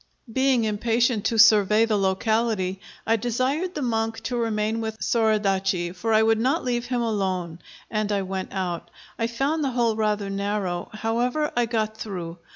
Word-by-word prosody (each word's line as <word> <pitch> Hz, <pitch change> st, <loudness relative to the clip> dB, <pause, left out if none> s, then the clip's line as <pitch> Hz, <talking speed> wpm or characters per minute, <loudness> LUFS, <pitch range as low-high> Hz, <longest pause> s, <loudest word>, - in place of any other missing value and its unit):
Being 260 Hz, -2 st, +3 dB
impatient 225 Hz, +1 st, +1 dB
to 230 Hz, -, +1 dB
survey 215 Hz, 0 st, +6 dB
the 220 Hz, -2 st, 0 dB
locality, 195 Hz, 0 st, 0 dB, 0.2 s
I 225 Hz, +1 st, +3 dB
desired 255 Hz, -, -1 dB
the 295 Hz, -, -2 dB
monk 225 Hz, -2 st, -1 dB
to 250 Hz, -, -2 dB
remain 225 Hz, -1 st, -1 dB
with 220 Hz, 0 st, -4 dB
Soradaci, 195 Hz, -6 st, +1 dB
for 225 Hz, +5 st, -2 dB
I 220 Hz, 0 st, +5 dB
would 225 Hz, 0 st, +3 dB
not 265 Hz, +8 st, +1 dB
leave 245 Hz, -1 st, -1 dB
him 245 Hz, -1 st, -1 dB
alone, 185 Hz, -6 st, -2 dB, 0.3 s
and 215 Hz, -1 st, -1 dB
I 200 Hz, -1 st, 0 dB
went 190 Hz, 0 st, -4 dB
out. 175 Hz, -3 st, -3 dB, 0.3 s
I 230 Hz, -, +1 dB
found 275 Hz, +7 st, -1 dB
the 275 Hz, -, +1 dB
hole 235 Hz, -3 st, +1 dB
rather 210 Hz, -2 st, -1 dB
narrow; 195 Hz, -3 st, -2 dB
however, 240 Hz, +7 st, -1 dB
I 240 Hz, -1 st, +2 dB
got 220 Hz, -1 st, -1 dB
through. 175 Hz, -6 st, -6 dB
220 Hz, 165 wpm, -24 LUFS, 200-235 Hz, 0.3 s, survey